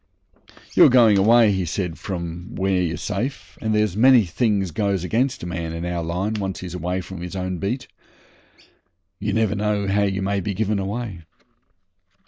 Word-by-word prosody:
'You're - - +7
going 120 -4 +6
away,' 115 +2 +5
he 95 -1 0
said, 85 0 -3
'from 85 -1 -6
where 95 -1 +1
you're 85 -2 -1
safe, 135 - -4
and 110 -1 0
there's 105 -3 +2
a - - -3
many 125 -3 +6
things 100 0 0
goes 100 +1 -1
against 125 +7 0
a - - -3
man 85 -2 -4
in 85 +1 -4
our 90 -1 -2
line, 90 +6 -2
once 95 -1 -4
he's 90 -2 -7
away 90 +1 -2
from 90 -1 -9
his 90 0 -6
own 90 -1 -3
beat. 120 +8 -3 1.3
You 105 +1 -2
never 110 0 +1
know 105 0 0
how 100 +1 +2
you 95 -1 0
may 100 +1 0
be 100 +1 -3
given 105 0 0
away. 100 -1 -4
95 Hz, 180 wpm, -22 LUFS, 90-105 Hz, 1.3 s, You're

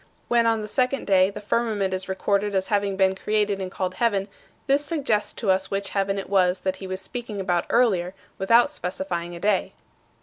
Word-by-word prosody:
When, 235 -1 +3
on 225 -1 +1
the - - -5
second 255 +4 0
day, 190 -1 +4
the 205 - -7
firmament 210 -2 0
is 185 +1 -4
recorded 200 +2 0
as 190 0 0
having 200 -2 0
been 190 -1 +3
created 205 0 0
and 185 - -3
called 185 -1 -3
heaven, 200 -1 0 0.4
this 280 +1 +2
suggests 280 -9 0
to 205 -5 0
us 190 +1 0
which 195 0 -2
heaven 195 0 0
it 195 - -4
was 185 -2 +2
that 190 0 -1
he 190 - -7
was 185 0 -4
speaking 230 -2 -6
about 180 -3 0
earlier, 195 -7 +2 0.2
without 230 +8 +4
specifying 175 - -4
a - - -8
day. 200 0 +1
195 Hz, 200 wpm, -24 LUFS, 190-215 Hz, 0.4 s, day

